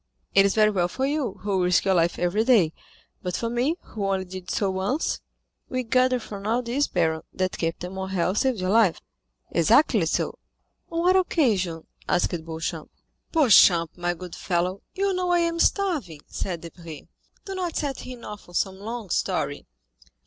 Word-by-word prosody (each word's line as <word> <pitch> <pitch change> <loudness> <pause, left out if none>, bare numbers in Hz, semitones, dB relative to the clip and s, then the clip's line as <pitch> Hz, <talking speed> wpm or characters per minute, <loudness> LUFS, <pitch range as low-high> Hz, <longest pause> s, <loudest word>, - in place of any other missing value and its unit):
It 195 0 +6
is 200 - -1
very 215 -1 +5
well 180 -4 +1
for 260 +9 -2
you, 280 -7 -1
who 195 -3 +1
risk 180 +1 +3
your 195 - +3
life 170 -1 +2
every 180 +5 +1
day, 215 -10 +4 0.5
but 180 -1 -3
for 230 0 -2
me, 250 +7 +1
who 205 -3 -4
only 190 -1 0
did 185 -1 -8
so 195 -2 0
once——" 195 +11 -1 0.5
"We 255 -1 -1
gather 255 +2 +2
from 205 -2 -7
all 235 +3 +1
this, 255 +5 0
baron, 160 -3 0
that 185 0 -2
Captain 175 +2 -3
Morrel 190 -1 -1
saved 255 +1 +1
your 185 +1 0
life." 215 -5 +4 0.5
"Exactly 215 - +4
so." - - -1 0.5
"On 335 0 -1
what 365 +2 +4
occasion?" 210 - +1 0.2
asked 175 - +2
Beauchamp. 160 -1 -4 0.4
"Beauchamp, 190 - +5
my 175 0 -1
good 180 0 -9
fellow, 180 +1 -1
you 395 0 +1
know 365 -1 -1
I 350 - +4
am 335 0 0
starving," 310 - +1
said 175 -4 -4
Debray: 170 -2 -10 0.4
"do 390 - -5
not 360 -3 -3
set 280 -3 -2
him 250 -2 -9
off 210 -3 -9
on 175 - -12
some 190 +1 0
long 220 -2 -6
story." - - -1
200 Hz, 175 wpm, -25 LUFS, 180-255 Hz, 0.5 s, It